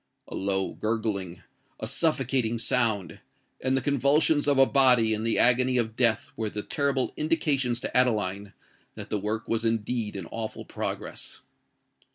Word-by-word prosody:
A - - -9
low 95 0 -1
gurgling—a 100 -6 -5
suffocating 130 -7 0
sound—and 115 +2 -2
the - - 0
convulsions 145 +2 +2
of 140 -1 +3
a 135 - +7
body 125 -5 +4
in 110 0 -3
the 115 0 0
agony 125 +1 +4
of 110 -2 -1
death 115 -3 +2
were 110 -1 -2
the 105 0 -5
terrible 140 -3 0
indications 140 -6 0
to - - -5
Adeline 105 -5 +1 0.4
that - - -9
the 105 - 0
work 110 +2 -3
was 115 0 -1
indeed 115 -1 -1
in 95 -3 -5
awful 110 -1 -5
progress! - - -6
115 Hz, 145 wpm, -26 LUFS, 105-130 Hz, 0.4 s, a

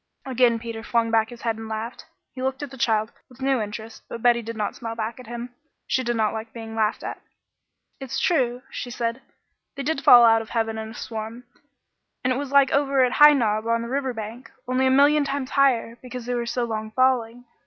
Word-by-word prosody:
Again 250 -3 +3
Peter 230 -1 -6
flung 230 0 0
back 220 -1 +2
his 240 -1 -12
head 225 -2 -1
and 225 0 -8
laughed. 220 +2 -5 0.3
He 255 - -7
looked 265 +2 -2
at 285 - -6
the - - -9
child 220 -1 +1 0.2
with 250 - -18
new 265 -2 +1
interest, 220 +1 -7
but 230 - -7
Betty 240 -1 +4
did 230 0 -7
not 210 -1 -2
smile 230 -1 -6
back 225 +1 -4
at 250 - -11
him. 240 +1 -7 0.3
She 260 - 0
did 240 -1 -1
not 220 -2 +1
like 220 0 -6
being 225 -1 -8
laughed 220 -1 0
at. - - -6 0.8
"It's 270 -3 -4
true," 255 -7 +1
she 250 - -5
said; 235 +1 -3 0.5
"they 275 - -4
did 290 0 -1
fall 240 -1 +9
out 225 -1 +5
of 220 - -10
heaven 225 -1 -1
in 220 0 -6
a 225 - -11
swarm, 225 +2 -6 0.8
and 255 +1 +2
it - - -2
was 280 -1 -4
like 280 -1 +5
over 275 -1 +3
at 250 - -1
High 295 +2 +8
Knob 220 -4 0
on 230 0 +1
the 235 - -6
river 265 0 -1
bank, 225 +2 -8 0.2
only 255 +1 +2
a - - +4
million 285 +3 +5
times 275 -2 -3
higher, 255 -4 +2
because 250 -1 -8
they 245 - -2
were 240 -1 -2
so 245 +1 -1
long 220 -2 -3
falling. 245 0 +1
235 Hz, 230 wpm, -24 LUFS, 225-260 Hz, 0.8 s, fall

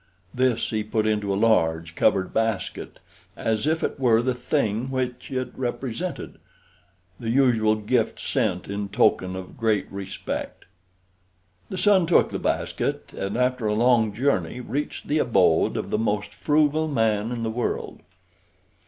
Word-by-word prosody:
This 125 -2 +1
he 110 -1 -1
put 110 0 -1
into 105 -2 0
a 95 - 0
large 85 -7 +2
covered 95 +2 +1
basket, 110 -3 -2 0.4
as 110 +4 -1
if 160 +1 +1
it - - -2
were 120 -3 +4
the 130 0 +1
thing 125 -2 -1
which 125 -1 -3
it 130 -1 -3
represented 130 +6 -4 0.8
the 115 - -4
usual 115 -4 +3
gift 110 +2 0
sent 105 -10 -1
in 100 0 -4
token 95 -1 +2
of 95 -1 -8
great 110 -3 +1
respect. 95 -2 -5 1.0
The 190 - -5
son 190 -2 +4
took 170 - +4
the - - -4
basket, - - -2
and 100 +3 -3
after 125 -2 +1
a 105 - +1
long 115 -1 +3
journey 115 -4 0
reached 135 +4 -4
the 150 +1 +1
abode 95 - +3
of - - -4
the 105 - +1
most 105 -2 -1
frugal 155 +1 +2
man 115 -5 +1
in 120 -2 -3
the 110 - -1
world. 120 +2 -3
115 Hz, 150 wpm, -24 LUFS, 105-130 Hz, 1.0 s, were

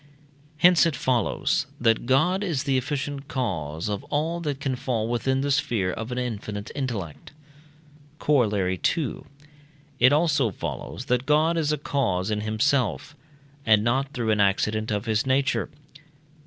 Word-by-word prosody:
Hence 175 +1 +6
it 160 - -1
follows, 125 -3 0
that 115 -1 +2
God 170 +9 +2
is 160 -9 -1
the 140 -2 0
efficient 140 +1 -3
cause 85 - -3
of 105 -2 -3
all 160 +4 -1
that 145 -5 -3
can 135 -2 -1
fall 120 -3 -2
within 130 +3 0
the 140 +1 0
sphere 115 -10 +1
of 115 +2 -6
an 125 - -3
infinite 110 -4 -4
intellect. 115 - -5 0.8
Corollary 105 - +1 0.2
II. 150 -7 -3 0.8
It 130 +2 +6
also 145 -5 +3
follows 115 +5 -6
that 125 +1 0
God 155 +3 +3
is 155 -3 +1
a 150 - 0
cause 110 -9 -1
in 105 0 -1
himself, 125 +6 0 0.5
and 110 -3 +4
not 135 +4 0
through 120 -6 -1
an 105 - +1
accident 105 +2 +1
of 105 0 -2
his 110 +2 0
nature. 135 +1 +1
125 Hz, 150 wpm, -25 LUFS, 110-145 Hz, 0.8 s, Hence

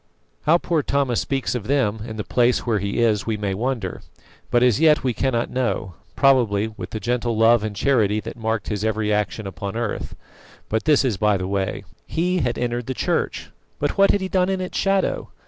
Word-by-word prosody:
How 165 +3 +6
"poor 170 -2 0
Thomas" 135 -4 0
speaks 135 -1 -2
of 120 -5 -4
them 125 -6 +1
in 110 -1 -7
the 105 - -3
place 120 +3 +1
where 115 -4 +1
he 100 +4 -1
is 110 -2 +1
we 110 -1 0
may 100 -2 -2
wonder, 115 -3 -3 0.5
but 120 0 +3
as 125 0 +3
yet 155 -3 +4
we 130 -2 +1
cannot 120 -1 -1
know 120 -7 -1 0.2
probably 115 -6 +3
with - - -7
the 110 - -5
gentle 120 0 -1
love 115 0 +5
and 110 -1 -4
charity 110 -3 +2
that - - -7
marked 110 -2 -2
his 105 -2 -2
every 110 -1 0
action 105 +1 -1
upon 95 +2 -5
earth. 115 -3 -3 0.5
But 110 +1 -1
this 150 -3 +4
is 115 -7 0
by 105 +1 +2
the 95 0 -3
way. 95 -1 -2 0.2
He 180 +2 0
had 120 -6 -1
entered 120 -1 -2
the 130 - -3
Church, - - -2 0.3
but 145 - -1
what 195 0 +5
had 205 - +2
he 190 - -2
done 185 0 +1
in 190 -1 0
its 185 -1 -5
shadow? 195 -1 0
120 Hz, 210 wpm, -22 LUFS, 105-135 Hz, 0.5 s, How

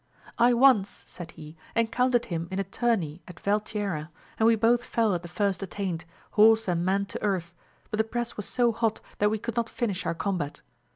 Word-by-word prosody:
I 240 +1 +6
once, 235 -5 +5 0.2
said 175 -2 -9
he, 155 -1 -11 0.2
encountered 240 +2 +2
him 170 -1 -3
in 190 - -4
a 195 - +1
turney 195 -6 -1
at 180 - -11
Valtierra, 205 -6 -1 0.3
and 220 - +5
we 230 - +6
both 235 +2 +3
fell 225 -4 +1
at 175 - -1
the 175 - -8
first 195 +3 -1
attaint, 185 -4 -4 0.3
horse 220 +1 +5
and 175 -1 +1
man 195 +2 +1
to - - -6
earth, 180 -4 -1 0.4
but 215 - -2
the - - +5
press 240 +1 -3
was 210 - -5
so 240 -1 +2
hot 225 -1 0 0.2
that 210 - +4
we 220 - 0
could 235 +3 -5
not 230 -1 0
finish 205 -6 -2
our - - 0
combat. 165 -4 -3
205 Hz, 205 wpm, -27 LUFS, 180-230 Hz, 0.4 s, I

